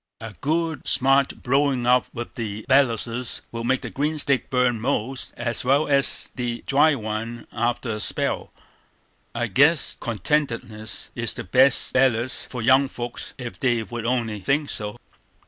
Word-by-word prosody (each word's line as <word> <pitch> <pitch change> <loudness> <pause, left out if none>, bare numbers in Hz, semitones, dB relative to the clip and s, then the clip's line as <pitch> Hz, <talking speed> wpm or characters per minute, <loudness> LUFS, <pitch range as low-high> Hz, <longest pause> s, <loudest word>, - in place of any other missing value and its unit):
"A 115 -2 -8
good 160 0 -1
smart 135 +1 +2
blowin' 135 -1 +1
up 125 +1 +4
with 120 0 -7
the 110 -2 -5
belluses 125 -2 +1
would 115 0 -5
make 130 +2 +1
the - - -6
green 150 +3 -1
stick 140 -3 +1
burn 125 -3 +1
most 130 0 -2
as 120 0 -1
well 140 +4 +3
as 140 -1 +1
the 120 -2 -4
dry 145 +2 +4
one 115 0 -5
after 120 +1 -1
a 105 - -3
spell. - - -1 0.8
I 120 0 0
guess 140 - +4
contentedness 115 - -2
is - - -1
the - - -5
best 130 +7 +4
bellus 125 -1 +1
for 125 -3 -6
young 130 +3 +5
folks, 120 -2 -7
ef 120 -2 -7
they 120 -3 +1
would 115 0 -5
only 115 -4 -1
think 140 +8 0
so." 105 -1 -4
125 Hz, 155 wpm, -23 LUFS, 115-135 Hz, 0.8 s, young